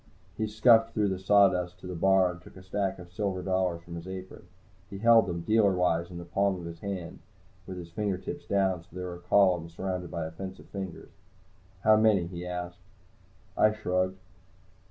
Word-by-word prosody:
He 110 0 -1
scuffed 115 +1 +4
through 105 -2 +2
the 95 -1 -2
sawdust 95 -2 +3
to - - -12
the 90 - -5
bar 95 +1 +3
and 90 0 -11
took - - -15
a 95 - -12
stack 95 +1 -2
of 90 -1 -12
silver 95 -2 -2
dollars 95 -3 0
from 85 - -10
his 85 +2 -8
apron. 95 -1 -8 0.4
He 100 - -7
held 115 0 +5
them, 85 -2 -3
dealerwise, 90 -6 +2
in 90 - -8
the 85 - -7
palm 95 +1 0
of 85 - -8
his 85 0 -8
hand, 95 -4 -5 0.5
with 95 - -6
his 85 -1 -9
fingertips 100 - -3
down, 95 -3 +1
so 85 - -22
that - - -17
they 90 - -4
were 90 -1 -5
a 85 - -9
column 90 -3 +3
surrounded 90 +1 -4
by 85 -2 -3
a 80 - -6
fence 95 +3 -7
of - - -15
fingers. 95 -3 -7 0.7
"How 110 0 +6
many?" 105 -5 +4
he 90 0 -7
asked. 90 0 -5 0.8
I 110 0 +4
shrugged. 95 -3 -1
95 Hz, 200 wpm, -29 LUFS, 90-100 Hz, 0.8 s, How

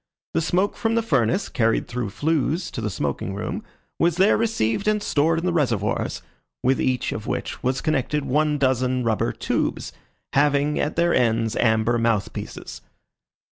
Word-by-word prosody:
The - - +1
smoke 185 +5 +1
from 225 0 0
the 230 - +2
furnace, 140 - +1
carried 115 -3 +1
through 120 -3 -3
flues 155 - -1
to 115 - -5
the 105 - -1
smoking 95 0 -3
room, 100 - -4 0.4
was 170 0 +2
there 190 +3 +5
received 205 - 0
and 215 0 +3
stored 160 0 +2
in 165 - -2
the 180 - +1
reservoirs, 115 - 0 0.4
with 130 +1 +2
each 130 -1 0
of 110 - -5
which - - -3
was 130 +1 0
connected 150 -1 0
one 150 +2 +1
dozen 130 -2 +1
rubber 110 -2 +1
tubes, - - -2 0.4
having 145 +1 +2
at 150 - -1
their 170 +1 +2
ends 115 -2 +1
amber 110 +1 +2
mouth 115 -3 0
pieces. - - -7
135 Hz, 165 wpm, -23 LUFS, 115-165 Hz, 0.4 s, there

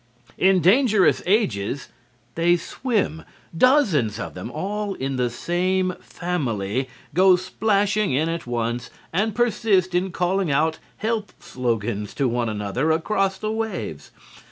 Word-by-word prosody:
In 190 -1 +4
"Dangerous 210 - +4
Ages" 135 - 0 0.4
they 175 +1 +3
swim. 190 - -2 0.3
Dozens 170 - +3
of - - -5
them, - - -6
all 200 +8 -3
in 135 0 -3
the 125 -1 +1
same 180 +8 0
family, 130 - -2 0.2
go 185 +3 +6
splashing 205 +1 +1
in 145 +5 +1
at 165 -4 -4
once 120 0 -2 0.2
and 210 +4 0
persist 210 -6 +2
in 180 +1 0
calling 180 0 0
out 160 +3 +1 0.2
health 220 -1 -2
slogans 115 -4 -3
to 140 - +1
one 120 -1 0
another 105 +7 -1
across 195 +4 +1
the 215 - -3
waves. 220 - -4
175 Hz, 130 wpm, -23 LUFS, 125-200 Hz, 0.4 s, go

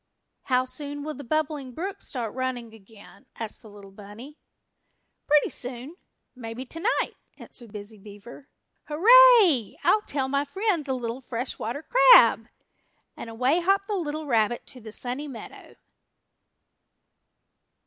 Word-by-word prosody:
"How 255 -1 +1
soon 290 +2 -5
will 305 +1 -5
the 285 - -10
Bubbling 290 -1 -3
Brook 390 +7 -6
start 235 -5 -5
running 250 -3 -4
again?" 220 +4 -17
asked 225 -2 -7
the 220 - -14
little 200 -1 -14
bunny. 210 +9 -13 0.9
"Pretty 295 0 +3
soon 255 +5 -7 0.4
maybe 240 +1 -7
tonight," 330 - -2 0.2
answered 235 -4 -11
Busy 210 0 -10
Beaver. 210 +7 -13 0.4
"Hurrah! 405 - +6
I'll 430 - +3
tell 275 -9 -3
my 280 +1 0
friend 345 +2 -2
the 265 -2 -2
little 240 +1 -5
Fresh 245 0 -5
Water 245 +7 -5
Crab!" - - +6 0.7
and - - -9
away 255 +8 +1
hopped 390 +2 +1
the 425 - -4
little 310 -5 -3
rabbit 235 -3 0
to 255 - -13
the 220 -1 -10
Sunny 255 +6 -5
Meadow. 255 -5 -11
260 Hz, 135 wpm, -25 LUFS, 230-310 Hz, 0.9 s, Hurrah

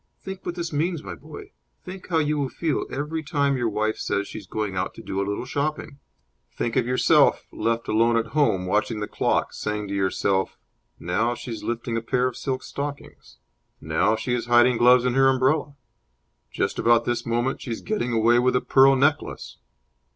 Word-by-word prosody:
Think 190 0 -8
what 175 - -4
this 170 -2 -4
means, 165 +2 -1
my 95 -3 -6
boy. 75 - -11 0.3
Think 185 0 -9
how 165 - 0
you 150 -1 +1
will 135 -2 -1
feel 160 0 -2
every 150 +3 -3
time 145 -3 0
your 120 -3 0
wife 110 +1 -1
says 100 0 -1
she - - -7
is 100 - -15
going 105 -1 -3
out 90 - -2
to - - -11
do 95 - -3
a 100 - -2
little 100 +4 -3
shopping! 145 +1 -3 0.5
Think 115 - -3
of - - +1
yourself, 125 0 +3
left 115 +1 -2
alone 115 +2 +3
at 115 - -2
home, 140 -12 +2
watching 105 +3 0
the 105 - -3
clock, - - 0
saying 105 -1 -4
to - - -4
yourself, 95 0 0 0.4
'Now 110 +8 0
she 120 - -8
is 110 - -6
lifting 120 0 -3
a - - -1
pair 125 +2 0
of 130 - -5
silk 130 -1 -3
stockings!' 140 0 -7 0.4
'Now 80 +8 +1
she 110 +3 -3
is 120 -1 -2
hiding 120 0 +5
gloves 125 +1 +5
in 125 - +1
her 135 +1 +5
umbrella!' 135 +2 +1 0.8
'Just - - -2
about 120 0 +3
this 120 0 -1
moment 120 +3 -1
she - - -8
is 115 - -4
getting 210 - -2
away 115 +1 +4
with 125 +1 +2
a 125 - +2
pearl 135 0 +5
necklace!'" 145 +3 -1
120 Hz, 200 wpm, -24 LUFS, 110-140 Hz, 0.8 s, hiding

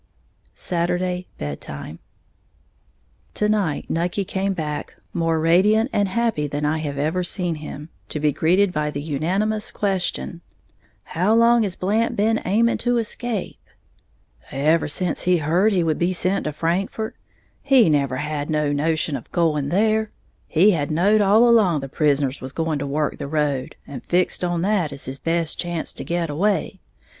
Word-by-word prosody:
Saturday, 180 +1 -1
Bed 75 -1 -5
time. 70 +2 -8 1.4
To 210 - +1
night 200 -8 0
Nucky 175 +4 -1
came 195 +1 -1
back, 150 -4 -4 0.2
more 165 -1 +1
radiant 205 - +3
and 205 -1 +2
happy 220 -8 0
than 145 +1 -3
I 155 +2 0
have 145 -3 -4
ever 160 +6 0
seen 175 -1 -1
him, 150 0 -8 0.2
to 150 - -3
be 150 0 +2
greeted 180 +6 +2
by 150 0 -1
the 145 - -4
unanimous 190 +9 -1
question, 185 -3 -2 0.6
"How 185 +7 +1
long 235 +1 +5
has 200 -4 -1
Blant 220 +5 0
been 220 +2 +1
aiming 230 +5 +2
to 245 0 +1
escape?" 230 -2 -3 0.9
"Ever 155 +4 +1
sence 175 +5 -1
he 180 0 +4
heared 170 +7 +2
he 185 -4 +2
would 160 -2 0
be 175 +2 +1
sent 185 +2 0
to 150 - -1
Frankfort, 180 +8 -2 0.5
he 265 -5 +5
never 140 -4 +1
had 150 +1 -3
no 150 -2 +1
notion 155 0 0
of 125 - -8
going 150 -5 +1
there. 215 +3 +2 0.4
He 185 +6 +4
has 145 -6 -1
knowed 200 +7 +3
all 210 +4 +5
along 200 -10 +4
the 135 - -5
prisoners 140 -1 0
was 130 +1 -7
going 160 -2 -1
to 140 - -3
work 150 +1 -1
the - - -4
road, 145 -3 -1
and 135 -3 -8
fixed 180 +1 0
on 175 -1 0
that 190 -6 +1
as 140 0 -5
his 135 +1 -5
best 165 -1 -1
chance 175 -2 -1
to - - -6
get 170 0 -1
away. 190 +3 0
170 Hz, 165 wpm, -22 LUFS, 150-200 Hz, 1.4 s, long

